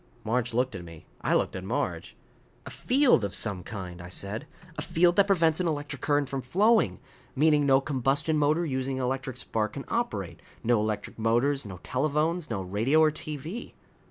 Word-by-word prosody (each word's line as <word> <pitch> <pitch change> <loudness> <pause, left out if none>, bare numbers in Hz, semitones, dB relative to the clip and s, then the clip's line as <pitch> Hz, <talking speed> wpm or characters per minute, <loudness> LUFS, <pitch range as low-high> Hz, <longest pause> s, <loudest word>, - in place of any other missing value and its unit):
Marge 120 +2 0
looked 125 +2 0
at 95 -3 -6
me. 85 -2 -12 0.2
I - - +1
looked - - 0
at - - -5
Marge. - - -3 0.5
"A - - -8
field 255 - +3
of 100 0 -2
some 100 -5 0
kind," 90 -3 -7
I 90 - -9
said. 105 +9 -4 0.3
"A - - -4
field 175 +1 +3
that 200 -1 +4
prevents 165 -5 +3
an 180 - +1
electric 145 -3 -3
current 145 -1 +1
from 135 0 -3
flowing. 210 - +3 0.4
Meaning 150 0 +4
no 135 -1 +6
combustion 135 +3 0
motor 155 +3 +2
using 130 -2 -2
an 130 - -2
electric 130 0 -3
spark 110 -1 -2
can 140 - -6
operate. 105 - -2 0.2
No 120 -1 +3
electric 110 +1 -3
motors. 120 +4 +2
No 95 -2 -8
telephones. 155 +5 0
No 100 -4 -2
radio 110 +11 +2
or 155 -1 +5
TV." 155 - -6
135 Hz, 185 wpm, -28 LUFS, 110-155 Hz, 0.5 s, no